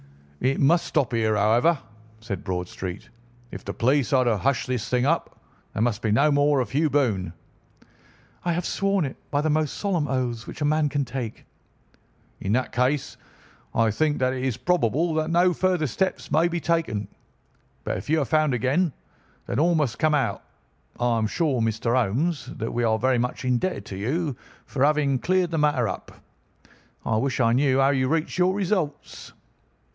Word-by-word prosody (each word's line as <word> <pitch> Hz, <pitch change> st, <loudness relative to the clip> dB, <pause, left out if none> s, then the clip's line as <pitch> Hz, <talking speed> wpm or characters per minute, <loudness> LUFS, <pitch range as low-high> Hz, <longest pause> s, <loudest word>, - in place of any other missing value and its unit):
"It 135 Hz, +2 st, +1 dB
must 165 Hz, +5 st, +3 dB
stop 135 Hz, -5 st, 0 dB
here, 110 Hz, -2 st, +1 dB
however," 115 Hz, +11 st, +3 dB, 0.4 s
said 110 Hz, -5 st, -5 dB
Bradstreet. 90 Hz, 0 st, -5 dB, 0.4 s
"If -, -, -8 dB
the -, -, -6 dB
police 135 Hz, +3 st, +2 dB
are 130 Hz, -2 st, +4 dB
to 120 Hz, -3 st, +2 dB
hush 135 Hz, +4 st, 0 dB
this 125 Hz, -3 st, -3 dB
thing 125 Hz, 0 st, +1 dB
up, 165 Hz, +4 st, -1 dB, 0.3 s
there 110 Hz, -, 0 dB
must 115 Hz, -4 st, 0 dB
be 110 Hz, -, 0 dB
no 140 Hz, +8 st, +4 dB
more 145 Hz, 0 st, +3 dB
of 125 Hz, -, -2 dB
Hugh 155 Hz, +3 st, +2 dB
Boone." 110 Hz, -, 0 dB, 1.1 s
"I 175 Hz, -, 0 dB
have 175 Hz, +1 st, -2 dB
sworn 195 Hz, -3 st, 0 dB
it 135 Hz, -, -6 dB
by 145 Hz, -, +1 dB
the 155 Hz, 0 st, +1 dB
most 155 Hz, -1 st, 0 dB
solemn 180 Hz, -7 st, -1 dB
oaths 125 Hz, -3 st, -2 dB
which -, -, -8 dB
a 150 Hz, -, 0 dB
man 155 Hz, 0 st, +2 dB
can 140 Hz, -1 st, -1 dB
take." 120 Hz, -2 st, -6 dB, 0.9 s
"In 100 Hz, -, -1 dB
that 130 Hz, +1 st, 0 dB
case 130 Hz, +3 st, 0 dB, 0.6 s
I 115 Hz, -1 st, +3 dB
think 150 Hz, +7 st, +1 dB
that 130 Hz, 0 st, +1 dB
it 130 Hz, -1 st, -4 dB
is 130 Hz, -4 st, -1 dB
probable 165 Hz, -, +1 dB
that 155 Hz, 0 st, 0 dB
no 175 Hz, +2 st, +3 dB
further 180 Hz, -3 st, +1 dB
steps 185 Hz, +6 st, -2 dB
may 160 Hz, +4 st, +4 dB
be 175 Hz, 0 st, -2 dB
taken. 165 Hz, -, -1 dB, 0.8 s
But -, -, -2 dB
if -, -, -8 dB
you 160 Hz, +1 st, +3 dB
are -, -, 0 dB
found 155 Hz, -2 st, +2 dB
again, 135 Hz, +7 st, +1 dB, 0.5 s
then -, -, -2 dB
all 170 Hz, +3 st, +3 dB
must 145 Hz, -8 st, 0 dB
come 155 Hz, -1 st, +3 dB
out. 120 Hz, -9 st, 0 dB, 0.6 s
I 120 Hz, -1 st, +2 dB
am 110 Hz, -, +1 dB
sure, 140 Hz, -1 st, 0 dB
Mr. 115 Hz, +1 st, 0 dB
Holmes, 130 Hz, -, 0 dB
that 115 Hz, -, -4 dB
we 120 Hz, -, 0 dB
are 110 Hz, -1 st, +2 dB
very 130 Hz, +1 st, +2 dB
much 125 Hz, +2 st, -3 dB
indebted 125 Hz, +9 st, 0 dB
to 95 Hz, -, -7 dB
you 140 Hz, -, -1 dB, 0.3 s
for 135 Hz, -, -1 dB
having 145 Hz, -2 st, +2 dB
cleared 180 Hz, +3 st, +1 dB
the 165 Hz, -, 0 dB
matter 145 Hz, -6 st, +2 dB
up. 95 Hz, -, -6 dB, 0.9 s
I 110 Hz, -, +1 dB
wish 130 Hz, +2 st, -1 dB
I 115 Hz, -2 st, +3 dB
knew 135 Hz, +1 st, +3 dB
how 135 Hz, +1 st, +4 dB
you 130 Hz, -2 st, +1 dB
reach 165 Hz, +3 st, -1 dB
your 185 Hz, +1 st, +3 dB
results." 180 Hz, -7 st, -3 dB
135 Hz, 185 wpm, -25 LUFS, 120-155 Hz, 1.1 s, are